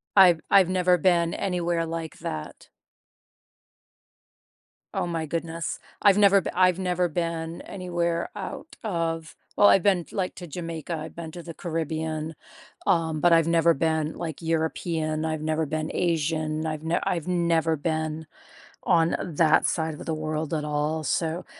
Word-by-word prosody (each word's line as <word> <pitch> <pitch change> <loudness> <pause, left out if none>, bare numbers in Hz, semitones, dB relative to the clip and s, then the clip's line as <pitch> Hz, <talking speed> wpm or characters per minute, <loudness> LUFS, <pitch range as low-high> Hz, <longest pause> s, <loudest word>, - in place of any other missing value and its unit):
I've 180 -5 +7
I've 190 -3 +6
never 180 -1 +3
been 170 -1 +2
anywhere 175 -3 -1
like 165 -1 -5
that. 75 -1 -6 2.2
Oh - - -1
my 165 -2 -2
goodness. 165 +1 -3 0.2
I've 200 -1 +6
never 200 -1 +6
be - - -4
I've 185 0 +4
never 180 -1 0
been 165 0 -3
anywhere 175 -3 -2
out - - -7
of 165 -5 -2 0.2
well, 205 - +6
I've 190 - +5
been, 190 -4 +3
like, 185 -2 -2
to 175 - -7
Jamaica, 165 0 -5
I've 155 +1 -8
been 170 -1 -6
to 175 - -8
the 165 -1 -8
Caribbean, 160 -2 -3 0.5
um, 160 -2 +2
but 175 +1 +5
I've 165 -1 +5
never 170 0 +4
been, 160 +1 0
like, 165 -2 -5
European, 160 -1 -1
I've 155 -1 -2
never 155 0 0
been 155 0 -2
Asian, 155 -2 0
I've 155 -1 -3
ne 165 +1 +1
I've 170 -2 -1
never 170 -2 +2
been 155 +1 -2 0.6
on 165 -2 +3
that 160 -1 +3
side 160 -2 -1
of - - -9
the 160 - 0
world 155 0 -2
at 150 - -2
all, 150 +1 -1
so, 165 +3 -1
165 Hz, 155 wpm, -26 LUFS, 160-175 Hz, 2.2 s, I've